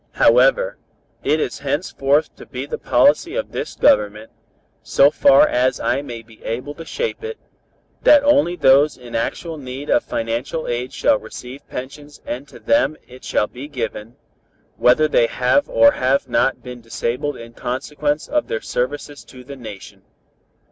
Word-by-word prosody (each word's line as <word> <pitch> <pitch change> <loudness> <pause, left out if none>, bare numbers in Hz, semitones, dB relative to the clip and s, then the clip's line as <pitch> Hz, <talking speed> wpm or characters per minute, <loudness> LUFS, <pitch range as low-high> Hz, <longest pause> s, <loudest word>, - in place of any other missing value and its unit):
However, - - +4 0.5
it 155 +2 +2
is 125 - -3
henceforth 145 0 0
to - - -13
be 130 +2 -5
the - - -5
policy 335 +7 +3
of - - -3
this - - -5
Government, 110 - +2 0.5
so 140 +1 +4
far 140 0 +5
as 125 +1 +1
I - - 0
may 120 -5 -8
be 110 -1 -19
able 125 +6 -4
to 165 +2 -10
shape 470 - -4
it, 455 0 -5 0.6
that 290 -1 +6
only 285 -11 +3
those 140 -1 +4
in 125 -2 -12
actual 155 +7 -3
need 135 +2 -6
of - - +3
financial 120 +8 -3
aid 120 +1 -3
shall 285 -2 +2
receive 130 +3 -10
pensions 145 +3 -8
and 130 +4 -5
to - - -14
them 285 - +1
it 125 +1 -14
shall - - +1
be 125 +6 -9
given, 115 -4 -5 0.6
whether 140 +6 +4
they 120 -5 +3
have 125 - +1
or 285 0 +6
have 130 - 0
not 125 +2 +1
been 125 -1 -9
disabled 125 +5 -3
in 115 0 -11
consequence 145 +5 -3
of 300 0 0
their 110 - -2
services 145 +3 -4
to 125 -1 -13
the 140 +2 -9
nation. 110 -6 -10
135 Hz, 160 wpm, -20 LUFS, 125-155 Hz, 0.6 s, that